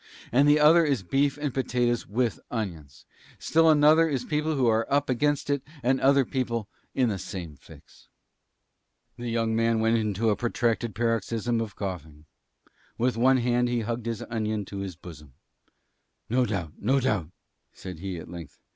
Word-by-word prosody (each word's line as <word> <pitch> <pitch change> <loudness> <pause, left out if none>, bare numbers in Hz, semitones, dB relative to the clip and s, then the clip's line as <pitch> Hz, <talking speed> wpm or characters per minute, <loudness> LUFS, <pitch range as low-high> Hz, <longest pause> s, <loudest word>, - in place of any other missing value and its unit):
And 140 +4 +4
the 150 +1 +5
other 155 +3 +7
one 155 -3 +1
is 130 -8 -1
beef 140 +8 +1
and 145 -3 -3
potatoes 125 -2 0
with 120 +2 -1
onions. 85 - -6 0.3
And - - -30
still 165 0 +4
another 155 +2 +6
one 155 -4 -1
is 125 -1 -4
people 150 +1 -1
who 130 -3 +1
are 115 -1 +1
up 140 -1 +2
against 145 +3 0
it 140 -1 0 0.2
and 130 +2 +2
other 135 0 +4
people 120 -5 -2 0.3
in 125 -3 +2
the 100 -3 -3
same 90 -7 -7
fix." 65 - -18 1.1
The 120 0 -5
young 115 -1 0
man 115 0 +2
went 115 +1 +2
into 110 0 0
a - - +1
protracted 120 -2 -1
paroxysm 115 +1 -1
of 110 -3 -5
coughing. 80 -6 -6 0.7
With 125 +1 +1
one 130 +3 +4
hand 120 0 +1
he 120 -1 0
hugged 115 +1 -4
his 115 -2 -3
onion 110 -3 -3
to 100 - -7
his 95 -3 -5
bosom. 75 -6 -13 1.0
"No 125 0 +2
doubt; 90 -8 -3
no 130 +6 +2
doubt," 105 - -1 0.4
said 90 -4 -9
he, 95 -1 -5
at 80 - -9
length. 85 -4 -10
115 Hz, 180 wpm, -26 LUFS, 100-130 Hz, 1.1 s, other